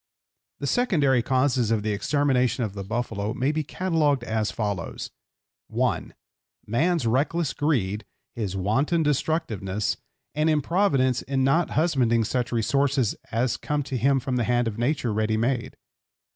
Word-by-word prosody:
The - - -5
secondary 145 - +2
causes 130 -2 +1
of 110 -2 +1
the 110 - 0
extermination 130 +1 +1
of 105 -4 -3
the 100 -1 -5
buffalo 110 0 -3
may 130 +4 +1
be 155 +1 -1
catalogued 150 -5 0
as 110 -2 -1
follows: 100 -5 -4 0.6
(1) - - -1 0.5
Man's 160 +7 +1
reckless 140 +6 +1
greed, 110 -9 0 0.3
his 100 -5 -3
wanton 135 - +1
destructiveness, 130 - -1 0.4
and 155 +2 +1
improvidence 150 - +2
in 135 0 -1
not 155 +6 +3
husbanding 130 -8 +3
such 125 +2 -1
resources 130 +1 +1 0.2
as 115 +2 0
come 150 -1 -2
to 135 - -5
him 135 +3 +3
from 130 0 -2
the 120 - +1
hand 120 0 +1
of 115 0 -4
nature 125 -2 0
ready 110 +1 +1
made. 120 +2 -1
130 Hz, 145 wpm, -25 LUFS, 110-145 Hz, 0.6 s, not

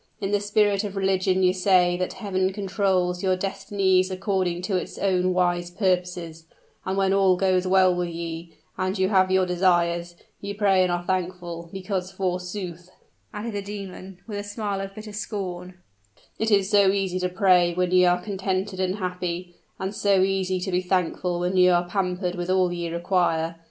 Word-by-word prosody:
In 195 - -2
the 205 - +2
spirit 205 -1 +2
of 200 -1 -5
religion 190 -1 +1
ye 180 0 +4
say 180 -2 +3
that 185 0 -2
Heaven 190 -3 -1
controls 190 -3 0
your 185 -1 +2
destinies 190 -1 +1
according 185 -2 -1
to 190 +1 -1
its 180 - -3
own 185 -2 +1
wise 175 -1 +1
purposes; 180 -3 -2 0.4
and 190 +1 -2
when 195 0 +2
all 190 -2 +4
goes 185 -1 +1
well 185 -1 +5
with 175 -1 -2
ye, 165 0 -6 0.2
and 185 +2 -1
you 190 0 +2
have 190 -2 +3
your 190 0 +3
desires, 175 -1 +1 0.2
ye 200 0 -5
pray 195 -2 +3
and 180 -1 +2
are 175 0 -1
thankful, 175 -2 -3
because, 190 -1 -4
forsooth," 180 -1 -4 0.4
added 215 +2 -5
the 205 - -2
demon, 195 -2 -8
with 210 -3 -5
a - - -4
smile 205 -1 -3
of 195 0 -7
bitter 215 -1 -9
scorn, 185 -4 -5 0.6
"it 220 - +1
is 200 -3 +3
so 200 -1 +4
easy 190 -2 0
to 180 0 -1
pray 180 -2 +3
when 180 0 0
ye 185 0 +5
are 180 0 +4
contented 190 -1 -2
and 185 0 0
happy, 180 -2 -4 0.2
and 190 +1 -4
so 200 -2 +3
easy 190 -1 0
to 190 +1 -3
be 180 0 +1
thankful 180 -1 -1
when 180 +1 -1
ye 180 0 +6
are 175 0 +2
pampered 180 -1 -1
with 175 0 -4
all 185 -1 +2
ye 170 -1 -3
require. 170 -1 0
185 Hz, 180 wpm, -24 LUFS, 180-195 Hz, 0.6 s, ye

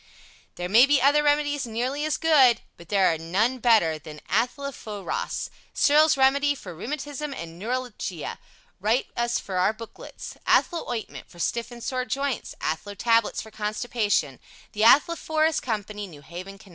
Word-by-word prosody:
There 180 - -4
may 230 +8 +6
be 290 0 +4
other 285 +3 +4
Remedies 290 -2 +1
nearly 255 +6 -2
as 310 - 0
good, 280 -7 +5
but 170 0 -15
there 195 -4 +3
are 160 - -4
none 210 +10 0
better 215 -10 +3
than 150 0 -10
ATH 230 +7 +1
LO 280 0 -4
PHO 210 -5 -8
ROS 480 - -3 0.2
Searles' 295 +1 +5
Remedy 280 +2 +3
for 185 -9 -9
Rheumatism 290 - -5
and 170 -3 -8
Neuralgia 230 - -4 0.4
Write 220 +6 +1
us 240 0 0
for 190 -2 -5
Our 185 +4 +3
Booklets 225 0 -10
ATHLO 340 -2 +2
OINTMENT 235 -3 -5
for 175 - -17
Stiff 235 +7 -2
and 240 -1 -10
Sore 255 -2 -2
Joints 275 -1 -3
ATHLO 200 +6 -3
TABLETS 230 0 +2
for 220 - -13
Constipation 210 - -1 0.3
THE 215 - -1
ATHLOPHOROS 315 +3 +4
COMPANY 210 -3 -4
New 150 -5 -14
Haven, 185 +6 -9
Conn. 195 - -17
235 Hz, 165 wpm, -25 LUFS, 195-280 Hz, 0.4 s, may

